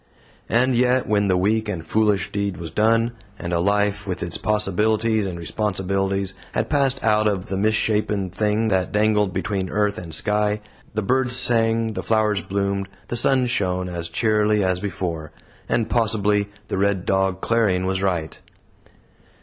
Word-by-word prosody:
And 125 +2 +3
yet, 125 +1 +2
when 105 -1 +2
the 95 -1 +2
weak 110 +3 +1
and 85 -5 -4
foolish 105 -2 +1
deed 100 -2 -2
was 85 -2 -7
done, 115 +5 +2 0.3
and 85 -1 -4
a 85 - +2
life, 100 +2 +1
with 90 -1 -3
its 85 0 -3
possibilities 105 +1 +1
and 90 -2 -5
responsibilities, 95 +1 -1 0.2
had 110 +1 -1
passed 135 -2 +1
out 110 -1 +3
of 100 -3 -1
the 95 - -2
misshapen 105 -2 +1
thing 105 +3 0
that 95 -2 0
dangled 105 -1 +2
between 95 -2 -2
earth 105 +1 0
and 85 -2 -8
sky, 105 +4 0 0.3
the 110 - 0
birds 125 +3 +1
sang, 115 -3 +1
the - - -3
flowers 110 -2 +1
bloomed, 100 0 -2 0.2
the - - -2
sun 130 +2 +3
shone, 95 -7 0
as 85 -1 -4
cheerily 105 +2 +2
as 95 -1 +1
before; 90 -5 -4 0.4
and 115 -2 +1
possibly 105 -3 +1 0.2
the - - -2
RED 100 -2 +1
DOG 95 -1 +1
CLARION 100 -5 +1
was 95 0 -1
right. 90 -5 -2
105 Hz, 160 wpm, -22 LUFS, 95-110 Hz, 0.4 s, And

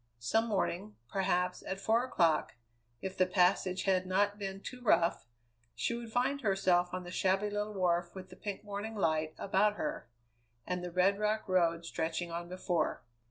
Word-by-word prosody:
Some 220 - +1
morning, 205 -1 -1
perhaps, 180 -2 0
at 190 - -5
four 225 +4 +2
o'clock, 170 -11 +2 0.5
if 190 0 -4
the 185 -1 +3
passage 185 0 +2
had 185 -1 +2
not 205 +2 +1
been 195 -1 -4
too 250 +5 -8
rough, 170 - +2 0.5
she 120 - -1
would 235 -1 -6
find 260 +4 +1
herself 185 -4 +2
on 185 0 -4
the 175 - -8
shabby 195 +3 +1
little 210 0 -2
wharf 175 -1 +1
with 185 -1 -9
the - - -10
pink 200 +1 -5
morning 205 +2 -5
light 155 -4 0
about 200 +2 +2
her, 300 - -4 0.6
and 180 0 -2
the 180 - -3
red 190 +3 +3
rock 215 +1 0
road 170 -3 +2
stretching 165 +1 -2
on 170 +1 -5
before. 180 -3 -1
190 Hz, 170 wpm, -33 LUFS, 175-210 Hz, 0.6 s, the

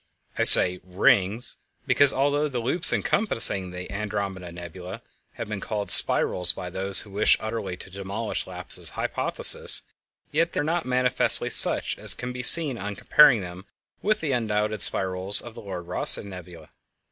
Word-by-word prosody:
I - - -4
say 90 0 +5
"rings" 95 +4 -1 0.3
because 140 -1 +4
although 145 +2 -1
the 130 - -7
loops 130 +9 0
encompassing 115 - +2
the 90 +2 -11
Andromeda 100 -3 -7
Nebula 90 +1 -12 0.3
have - - -9
been 105 -1 -7
called 105 0 -5
spirals 90 -1 +4
by 90 - -10
those 95 +2 -1
who 105 - -15
wish 105 +2 +1
utterly 110 -5 -7
to 95 - -12
demolish 100 +4 -7
Laplace's - - -4
hypothesis, - - +1 0.5
yet 165 +3 -2
they - - -4
are - - -2
not 165 +2 -4
manifestly 125 -1 +1
such, - - +3
as - - +1
can 125 0 -8
be 125 - -7
seen 140 -2 +4
on 100 +1 -7
comparing 135 0 +3
them 90 +2 -12 0.3
with 215 +1 -2
the 155 -3 -4
undoubted 110 -3 -4
spirals 95 +1 +1
of 120 - -8
the - - -13
Lord 95 -4 -10
Rosse 90 - +4
Nebula. 90 -3 -13
105 Hz, 160 wpm, -22 LUFS, 95-125 Hz, 0.5 s, say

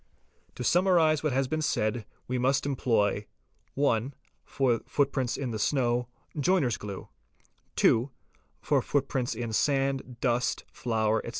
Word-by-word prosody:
To 125 - -5
summarise 170 -1 +3
what 155 - 0
has 135 +1 +1
been 155 +4 -2
said 110 -6 -1 0.2
we 125 0 -1
must 135 +3 +2
employ 110 -7 +1 0.2
:— - - -42
(1) 135 -1 +1 0.3
for 125 -4 +1
footprints 135 -3 0
in 130 -4 -3
the 110 - -4
snow: 120 0 +1 0.3
joiner's 145 - +2
glue; 100 -2 -7 0.7
(2) 120 +5 +3 0.5
for - - +2
footprints 130 -3 -1
in 115 -1 -4
sand, 135 -1 0
dust, 125 0 0
flour, 110 -2 0
etc. - - -6
125 Hz, 135 wpm, -28 LUFS, 115-140 Hz, 0.7 s, summarise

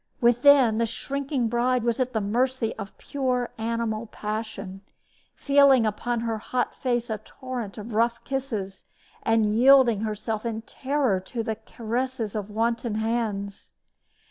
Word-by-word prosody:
Within, 245 -1 +5
the 230 - +2
shrinking 275 +1 -2
bride 240 +1 +1
was 235 0 0
at 255 -1 0
the 220 - -1
mercy 240 +3 0
of 200 -2 -8
pure 255 -3 -1
animal 230 0 -2
passion, 210 -3 -5 0.5
feeling 275 -4 +5
upon 230 +2 -1
her 225 -1 -2
hot 250 +3 -2
face 240 -2 -1
a 215 - -2
torrent 240 -2 -7
of 215 +2 -7
rough 235 +2 +1
kisses, 225 -8 -4 0.4
and 225 -1 +2
yielding 235 0 +5
herself 215 0 -3
in 225 -1 -3
terror 265 -6 0
to 225 +5 -5
the 220 -1 -2
caresses 230 +1 -3
of 210 -1 -4
wanton 230 +1 -1
hands. 220 -3 -2
230 Hz, 140 wpm, -26 LUFS, 215-255 Hz, 0.5 s, Within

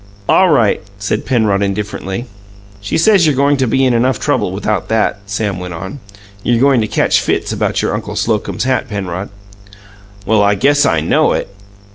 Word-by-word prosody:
"All 190 -1 +4
right," 120 -9 +2 0.2
said 100 0 -3
Penrod 110 -6 +1
indifferently. 100 +2 -3 0.5
"She 100 0 -2
says 185 -1 +4
you're 150 - +2
goin' 140 +2 +3
to 130 -1 0
be 130 +4 +2
in 125 - +2
enough 120 +1 +1
trouble - - 0
without 105 +1 -2
that," 110 -2 0
Sam 100 -2 -2
went 90 -1 -6
on. 95 +11 -7 0.4
"You're 120 +2 +1
goin' 135 -2 +4
to 110 - -1
catch - - +2
fits - - -1
about - - -1
your - - 0
Uncle - - -4
Slocum's - - -1
hat, 130 0 -1
Penrod." 95 -2 -4 1.0
"Well, 110 -1 +3
I 100 0 +3
guess 145 +7 +3
I 80 -2 +1
know 80 - +2
it." - - -3
110 Hz, 180 wpm, -15 LUFS, 100-130 Hz, 1.0 s, All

